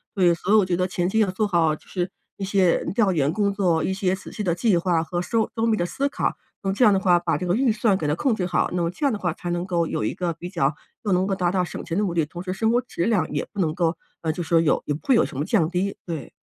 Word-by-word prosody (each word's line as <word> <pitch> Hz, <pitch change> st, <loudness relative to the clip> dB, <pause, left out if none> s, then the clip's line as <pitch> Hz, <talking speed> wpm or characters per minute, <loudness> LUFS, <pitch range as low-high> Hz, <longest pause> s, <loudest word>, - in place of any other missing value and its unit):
所 190 Hz, -, +1 dB
以 175 Hz, -1 st, +6 dB
所 180 Hz, +3 st, -3 dB
以 -, -, +7 dB
我 205 Hz, -, +4 dB
觉 180 Hz, -1 st, 0 dB
得 185 Hz, +1 st, 0 dB
前 175 Hz, -1 st, -1 dB
期 220 Hz, +4 st, +1 dB
要 210 Hz, -, +3 dB
做 200 Hz, +4 st, 0 dB
好， 165 Hz, -5 st, +2 dB
就 -, -, -20 dB
是 180 Hz, -1 st, -2 dB, 0.3 s
一 200 Hz, -, -5 dB
些 190 Hz, -3 st, +2 dB
调 210 Hz, -5 st, +3 dB
研 145 Hz, -3 st, +1 dB
工 200 Hz, +1 st, 0 dB
作， 180 Hz, -5 st, +1 dB
一 190 Hz, -, 0 dB
些 190 Hz, -1 st, 0 dB
仔 195 Hz, -, -11 dB
细 -, -, -5 dB
的 175 Hz, -5 st, 0 dB
计 200 Hz, +2 st, +2 dB
划 170 Hz, -1 st, +1 dB
和 175 Hz, +1 st, -3 dB
周 220 Hz, +5 st, 0 dB
周 225 Hz, 0 st, +1 dB
密 220 Hz, -1 st, +2 dB
的 175 Hz, -, 0 dB
思 280 Hz, +9 st, -1 dB
考。 -, -, -1 dB, 0.3 s
那 195 Hz, -, +1 dB
么 -, -, +1 dB
这 250 Hz, +4 st, +4 dB
样 210 Hz, -, +6 dB
的 195 Hz, -, +3 dB
话， 180 Hz, -2 st, +4 dB
把 170 Hz, -1 st, 0 dB
这 180 Hz, -, -4 dB
个 180 Hz, -, +1 dB
预 245 Hz, -2 st, +2 dB
算 215 Hz, -3 st, +2 dB
给 150 Hz, -, -2 dB
它 150 Hz, -, +1 dB
控 255 Hz, -, +1 dB
制 185 Hz, -4 st, -1 dB
好， 180 Hz, -1 st, +1 dB
那 180 Hz, -, 0 dB
么 170 Hz, -, +1 dB
这 285 Hz, -, -3 dB
样 275 Hz, -, +3 dB
的 210 Hz, -, -3 dB
话 175 Hz, -3 st, -1 dB
才 175 Hz, -, -6 dB
能 175 Hz, +1 st, -1 dB
够 175 Hz, -3 st, 0 dB
有 -, -, -3 dB
一 -, -, -1 dB
个 175 Hz, -2 st, -2 dB
比 170 Hz, +2 st, -7 dB
较 155 Hz, -6 st, +1 dB, 0.3 s
又 205 Hz, -, -1 dB
能 185 Hz, +1 st, +2 dB
够 195 Hz, -, 0 dB
达 175 Hz, -2 st, 0 dB
到 185 Hz, -1 st, +1 dB
省 -, -, -7 dB
钱 170 Hz, -, -3 dB
的 -, -, +2 dB
目 180 Hz, -, -2 dB
的， 165 Hz, -2 st, +1 dB
同 170 Hz, +4 st, -8 dB
时 185 Hz, 0 st, -3 dB
生 220 Hz, +4 st, +1 dB
活 240 Hz, -, +3 dB
质 245 Hz, -8 st, -4 dB
量 195 Hz, -8 st, +1 dB
也 -, -, -1 dB
不 205 Hz, -, -8 dB
能 160 Hz, -3 st, +1 dB
够， 170 Hz, -2 st, 0 dB, 0.2 s
呃， 160 Hz, -1 st, 0 dB
就 175 Hz, -, -4 dB
说 165 Hz, 0 st, +3 dB
有 155 Hz, -, +2 dB
也 145 Hz, -, -1 dB
不 150 Hz, -, -8 dB
会 275 Hz, -, +4 dB
有 235 Hz, -, +4 dB
什 130 Hz, -, -8 dB
么 145 Hz, -, 0 dB
降 170 Hz, -2 st, +2 dB
低， 185 Hz, +2 st, -2 dB
对。 160 Hz, -8 st, -5 dB
180 Hz, 355 characters per minute, -24 LUFS, 170-200 Hz, 0.3 s, 以